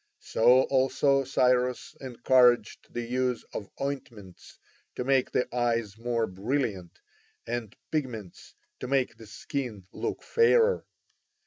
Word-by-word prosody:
So 125 +3 +4
also 135 +1 +2
Cyrus 125 -1 +1
encouraged 125 -2 +2
the 120 - -3
use 125 0 -1
of 100 - -6
ointments 120 -9 -7 0.4
to - - -2
make 135 0 +2
the 125 - +1
eyes 115 -4 0
more 115 0 -1
brilliant 100 - -3 0.5
and 115 -3 -4 0.2
pigments 120 - -5 0.2
to 125 - -5
make 135 -1 0
the 110 - -13
skin 110 -3 -5
look - - -4
fairer. 465 0 +3
125 Hz, 115 wpm, -28 LUFS, 115-135 Hz, 0.5 s, So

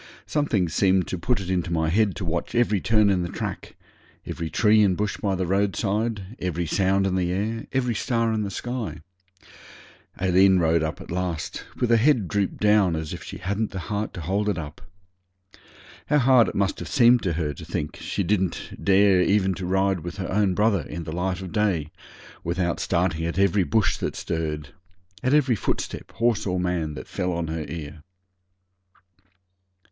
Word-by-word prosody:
Something 120 - 0
seemed 95 +2 +2
to 95 - -2
put 120 +5 0
it 95 -1 -4
into 90 -1 -1
my 80 -2 +1
head 100 +2 +2
to 95 - -5
watch 85 +7 -3
every 110 -5 +2
turn 105 0 +3
in 95 -2 +1
the 85 - -3
track - - -5 0.5
every 85 -1 -4
tree 110 +3 +4
and 95 -3 +3
bush 105 -1 -1
by 100 -2 -1
the 95 0 -1
roadside 100 +2 -1
every 85 -1 -2
sound 95 +3 +1
in 95 - 0
the 90 -1 0
air 110 +5 -2
every 125 -3 0
star 115 +1 0
in 110 - 0
the 100 - -2
sky. 120 +1 -5 1.2
Aileen 95 +1 +4
rode 85 -1 +3
along 80 0 -2
at - - -10
last 90 -2 -3
with 120 - +1
her 115 - +6
head 120 -4 +3
drooped 100 +2 -1
down 105 -5 +3
as 80 -1 -4
if - - -7
she - - -8
hadn't 100 +4 -2
the - - -7 0.2
heart 105 +1 -2
to 85 - -5
hold 100 +6 0
it 100 - -1
up. 75 -3 -7 1.3
How 150 - +3
hard 125 -3 +5
it - - -5
must 100 -1 0
have - - -6
seemed 120 -2 +5
to 90 -4 -1
her 75 -2 -2
to - - -10
think 75 0 -4
she 100 - -3
didn't 95 -1 -2
dare 100 -1 +5
even 95 0 +2
to 90 0 -5
ride 95 0 +1
with 85 +4 -7
her 95 - -4
own 95 -2 +2
brother 105 -3 +2
in 85 +2 -6
the 80 - -6
light 90 +1 -2
of 95 -2 -7
day 95 -8 0 0.5
without 85 0 -1
starting 85 -2 0
at 85 - -4
every 100 0 +3
bush 100 -2 +1
that - - -3
stirred 75 -3 -3 0.5
at 130 +3 +2
every 130 -5 +3
footstep, - - -3
horse 115 -3 +1
or 90 -1 0
man, 85 -4 -1
that 65 - -8
fell 90 0 -2
on 85 -2 -2
her 80 -1 -4
ear! 75 -2 -7
95 Hz, 190 wpm, -24 LUFS, 85-105 Hz, 1.3 s, her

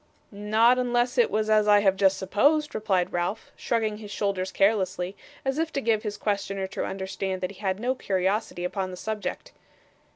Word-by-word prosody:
'Not 220 +4 +3
unless 245 +1 +1
it 240 - +4
was 215 +1 0
as 215 -1 +3
I 205 0 +6
have 195 -2 +3
just 195 0 +3
supposed,' 285 +11 +2
replied 190 -4 0
Ralph, 175 +5 -2
shrugging 220 -3 -1
his 210 -2 -9
shoulders 195 -2 -2
carelessly, 195 -2 +1 0.3
as 270 +3 0
if 325 0 -1
to 275 - 0
give 225 -4 +1
his 210 -2 -4
questioner 200 -2 -2
to 190 - -4
understand 190 0 -3
that 185 +1 -2
he 195 - -15
had 190 -2 -1
no 250 +3 0
curiosity 195 -4 -1
upon 185 +1 -2
the 180 - -8
subject. 215 +1 -4
205 Hz, 185 wpm, -26 LUFS, 190-225 Hz, 0.3 s, I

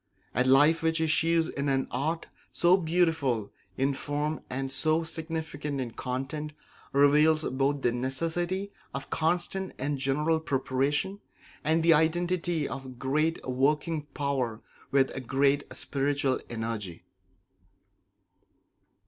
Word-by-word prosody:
A 125 - +3
life 145 +5 +5
which 160 0 +1
issues 160 +1 +2
in 140 0 -2
an 135 -1 +1
art 155 +6 -1 0.3
so 175 +1 +4
beautiful 160 - +1 0.2
in 135 +1 +2
form 150 +3 -2
and 135 +1 -3
so 155 +4 +2
significant 160 -3 -4
in 125 -3 -3
content 135 +6 -4 0.4
reveals 150 +3 +5
both 140 +1 0
the 120 - +3
necessity 165 +10 -2 0.2
of 140 - -6
constant 175 +3 0
and 140 +1 -2
general 150 +4 +1
preparation, 145 +6 -1 0.4
and 160 +2 +2
the 165 0 +7
identity 170 0 +1
of 130 -2 -7
great 155 +6 0
working 150 +4 0
power 130 -6 -1 0.3
with 135 -2 +1
great 140 +2 +2
spiritual 140 -1 0
energy. 110 -7 -4
145 Hz, 115 wpm, -28 LUFS, 135-160 Hz, 0.4 s, the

